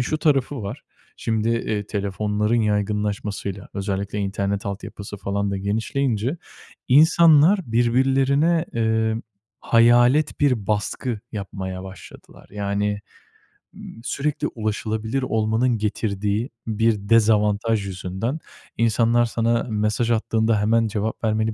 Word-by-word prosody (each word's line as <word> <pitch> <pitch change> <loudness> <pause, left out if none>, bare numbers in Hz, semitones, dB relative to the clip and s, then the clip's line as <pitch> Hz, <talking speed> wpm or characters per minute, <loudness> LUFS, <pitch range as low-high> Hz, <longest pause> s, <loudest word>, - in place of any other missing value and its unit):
şu 155 +5 -1
tarafı 140 -4 +1
var. 100 - -6 0.3
Şimdi, 110 -1 -1
eee, 110 -3 -1
telefonların 105 +3 -1
yaygınlaşmasıyla, 105 -1 -2
özellikle 100 +1 -3
internet 100 0 -2
altyapısı 100 +1 -6
falan 100 +1 -2
da 100 - -2
genişleyince 110 - -1 0.5
insanlar 160 +5 +6
birbirlerine, 135 +7 +2
eee, 110 -1 +1 0.4
hayalet 120 +5 +4
bir 125 -8 +2
baskı 105 +3 -2
yapmaya 95 -3 -5
başladılar. 95 0 -13
Yani, 100 0 -1 0.8
ııı, - - -11 0.2
sürekli 140 +3 -2
ulaşılabilir 110 +2 -2
olmanın 115 +1 +1
getirdiği 105 +1 -2 0.2
bir 110 -2 0
dezavantaj 105 -1 +3
yüzünden, 95 - -4 0.4
insanlar 115 +1 +3
sana 115 0 0
mesaj 110 +2 0
attığında 110 -1 +1
hemen 115 +2 +2
cevap 110 +2 -3
vermeni 110 0 0
110 Hz, 105 wpm, -22 LUFS, 100-120 Hz, 0.8 s, insanlar